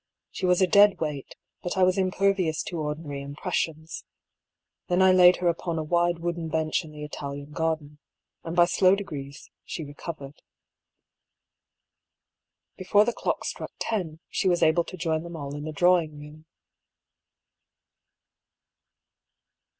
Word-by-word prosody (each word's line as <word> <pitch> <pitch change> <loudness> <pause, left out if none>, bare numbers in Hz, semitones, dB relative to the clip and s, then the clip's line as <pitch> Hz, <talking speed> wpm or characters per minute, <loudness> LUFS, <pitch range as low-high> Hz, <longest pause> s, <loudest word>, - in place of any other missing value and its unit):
She 185 - -2
was 180 +1 +4
a - - +7
dead 200 +2 +5
weight, 150 -4 -4 0.3
but 175 - -4
I 190 - +4
was 185 +1 +3
impervious 185 -3 +1
to 170 - -5
ordinary 150 -2 -4
im 140 +1 -8
pressions. 160 -2 -3 0.8
Then 180 0 +1
I 190 0 +6
laid 180 -1 +7
her 180 - -1
upon 170 0 -1
a 160 - -1
wide 175 +2 +1
wooden 170 -1 -3
bench 160 +1 0
in 155 - -11
the 150 0 -9
Italian 145 -1 -7
garden, 155 -2 -2 0.4
and 165 +1 -5
by 175 -1 +6
slow 185 +2 +4
degrees 145 -8 -8
she 165 - -6
recov 150 +3 -7
ered. 140 +1 -11 2.4
Before 205 +3 +3
the 240 - 0
clock - - -2
struck - - -5
ten, 175 -8 -3
she 190 - 0
was 175 -1 +2
able 160 +2 +3
to 185 - -9
join 160 -2 -1
them 170 0 -8
all 145 -2 -6
in 145 0 -6
the 155 - -4
drawing 170 -1 +2
room. 150 +1 -12
165 Hz, 150 wpm, -26 LUFS, 150-180 Hz, 2.4 s, a